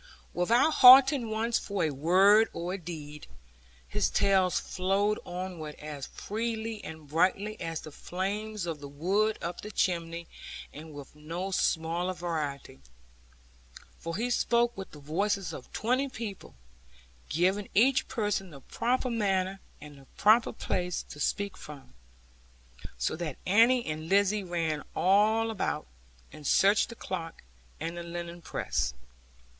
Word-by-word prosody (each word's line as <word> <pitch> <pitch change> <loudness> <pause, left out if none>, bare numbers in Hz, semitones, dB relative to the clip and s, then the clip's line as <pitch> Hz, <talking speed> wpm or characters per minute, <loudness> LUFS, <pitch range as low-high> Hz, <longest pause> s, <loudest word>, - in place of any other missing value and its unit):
Without 230 - +3
halting 260 -2 +8
once 225 +2 0
for 200 -3 -2
a 155 - +1
word 190 +9 +5
or 175 +2 -4
a - - -2
deed, 150 -3 -8 0.6
his 75 - 0
tales 190 -2 +3
flowed 195 +3 0
onward 175 -4 -6
as 150 -2 -7
freely 225 0 -4
and 160 -2 -9
brightly 190 +7 0
as 165 -2 -3
the 155 - -10
flames 200 +5 -4
of 165 -3 -4
the 140 - -8
wood 195 +10 0
up 170 +1 -4
the 210 - -7
chimney, 170 -4 -1 0.5
and 155 +2 -10
with 145 0 -11
no 165 +6 -5
smaller 175 +1 0
variety. 150 - -4 1.2
For 165 +1 -4
he 245 +3 -1
spoke 240 0 +2
with 195 -1 -7
the - - -13
voices 180 +4 -1
of 130 - -10
twenty 255 +5 0
people, 220 -6 -7 0.7
giving 190 +5 +1
each 255 +6 +4
person 205 -4 -2
the 140 -4 -12
proper 250 - -1
manner, 195 -4 0 0.2
and 145 -1 -12
the 135 - -17
proper 220 +3 +5
place 180 -5 -2
to 145 - -10
speak 200 +5 -1
from; 140 - -12 1.0
so - - -1
that 160 -5 -4
Annie 235 +5 +4
and 155 +1 -5
Lizzie 200 +1 +3
ran 165 -4 -2
all 215 +4 +3
about, 215 - -2 0.5
and 150 -2 -7
searched 200 +4 +4
the 235 - -8
clock 170 -6 -6 0.4
and 165 +1 -4
the 175 - -5
linen 170 0 -7
press. 65 - -2
185 Hz, 140 wpm, -29 LUFS, 160-215 Hz, 1.2 s, halting